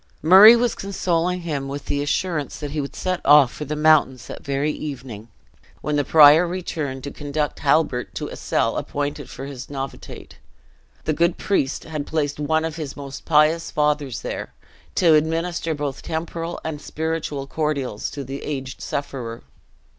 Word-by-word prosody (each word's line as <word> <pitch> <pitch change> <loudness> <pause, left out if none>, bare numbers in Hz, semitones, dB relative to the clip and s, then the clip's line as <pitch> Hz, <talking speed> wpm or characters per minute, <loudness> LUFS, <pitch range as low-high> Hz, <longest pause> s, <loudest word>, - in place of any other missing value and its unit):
Murray 195 +8 +10
was 240 0 +1
consoling 180 -2 -1
him 145 -5 -3
with 140 +1 -6
the 145 - -1
assurance 150 0 -1
that 145 -2 -6
he 150 0 -1
would 140 - -7
set 185 -1 -2
off 145 -4 +6
for 150 - -6
the 150 +2 -3
mountains 150 -5 +3
that - - -9
very 140 +2 0
evening, 130 -8 -7 0.5
when 150 - -1
the 145 - +2
prior 155 +4 +7
returned 155 -7 -4
to 140 - -5
conduct 145 +1 -3
Halbert 140 -4 +1
to - - -3
a - - -8
cell - - 0
appointed 145 -1 -3
for 135 - -7
his 135 -2 -8
novitiate. 135 -1 -7 0.6
The 155 - 0
good 170 +2 +1
priest 145 -9 0
had 155 -3 -5
placed 145 -2 -1
one 160 +2 +1
of 160 -1 -4
his 150 -4 -6
most 140 -1 -8
pious 155 +1 +3
fathers 150 -4 0
there, - - -6 0.4
to 170 -3 +5
administer 165 +1 0
both 145 -2 -4
temporal 165 +1 -4
and 155 -2 -4
spiritual 160 -3 -3
cordials 140 -7 -2
to 140 - -6
the 135 +2 -6
aged 135 -3 -5
sufferer. 125 -5 -5
150 Hz, 165 wpm, -22 LUFS, 140-160 Hz, 0.6 s, Murray